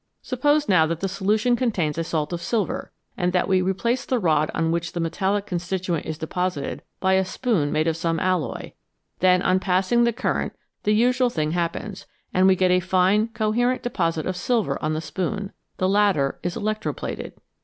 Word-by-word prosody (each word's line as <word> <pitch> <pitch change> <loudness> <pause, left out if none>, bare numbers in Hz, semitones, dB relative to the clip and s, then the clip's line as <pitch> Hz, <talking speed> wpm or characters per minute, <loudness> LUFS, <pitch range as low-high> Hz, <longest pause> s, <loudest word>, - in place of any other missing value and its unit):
Suppose 290 +3 +1
now 165 -5 +4
that 165 0 -2
the 195 - 0
solution 210 +5 +1
contains 200 -12 0
a 165 - -1
salt 160 -1 -2
of 170 - -3
silver, 205 -1 -2 0.2
and 180 -1 0
that 180 - +2
we 190 -1 +3
replace 195 +7 0
the 255 - 0
rod 155 -7 +2
on 165 0 +1
which 170 0 -2
the 175 - -3
metallic 190 +5 0
constituent 180 -2 -2
is 155 - -4
deposited 165 -2 -3 0.2
by 190 0 +2
a 190 0 +4
spoon 185 - 0
made 155 0 +1
of 165 -1 +1
some 165 0 -1
alloy, 185 -3 -1 0.5
then 185 0 +4
on 185 - +3
passing 190 +6 +2
the 235 - +3
current 235 +3 -2 0.3
the 210 0 +3
usual 250 +2 +3
thing 155 -8 -1
happens, 175 +4 -3 0.3
and 185 +1 +4
we 190 - +5
get 185 0 +2
a 180 - +4
fine, 190 +4 +2
coherent 235 +3 0
deposit 165 -9 -1
of 185 - -2
silver 230 +4 0
on 155 +1 0
the 155 - -2
spoon; 195 +5 -3 0.3
the 185 - +1
latter 195 -9 +2
is 175 +3 -3
electro 215 -1 -2
plated. - - -6
185 Hz, 190 wpm, -23 LUFS, 170-215 Hz, 0.5 s, we